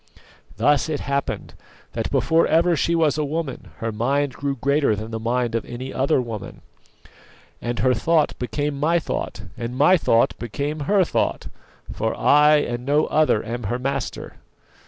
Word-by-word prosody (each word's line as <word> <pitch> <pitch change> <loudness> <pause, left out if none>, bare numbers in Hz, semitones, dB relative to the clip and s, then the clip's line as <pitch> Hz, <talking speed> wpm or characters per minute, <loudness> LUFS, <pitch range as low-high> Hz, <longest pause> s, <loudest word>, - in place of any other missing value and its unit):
Thus 145 +1 +2
it 150 -2 -2
happened, 140 0 -3 0.4
that - - -2
before 165 +1 +2
ever 170 +2 +3
she 170 +3 +1
was 155 -2 +2
a - - +1
woman, 150 -2 -4
her 115 0 -3
mind 135 +5 0
grew 140 0 -3
greater 140 -2 +1
than 110 +2 -7
the 110 - -3
mind 120 +1 -1
of 115 - -1
any 125 +2 -7
other 135 +2 +2
woman, 115 -5 -6 1.0
and 120 0 -3
her 130 -1 +3
thought 160 +2 +2
became 140 +5 -2
my 165 +4 +2
thought, 120 -9 -4
and 120 +2 -5
my 165 +7 +5
thought 115 -7 +2
became 140 +6 -3
her 200 -2 +5
thought, - - -1 0.4
for - - -2
I 150 +1 +5
and 120 -5 -1
no 145 +3 +2
other 155 -8 +2
am 120 0 -5
her 120 +5 -1
master. 135 +1 -4
140 Hz, 165 wpm, -22 LUFS, 120-150 Hz, 1.0 s, my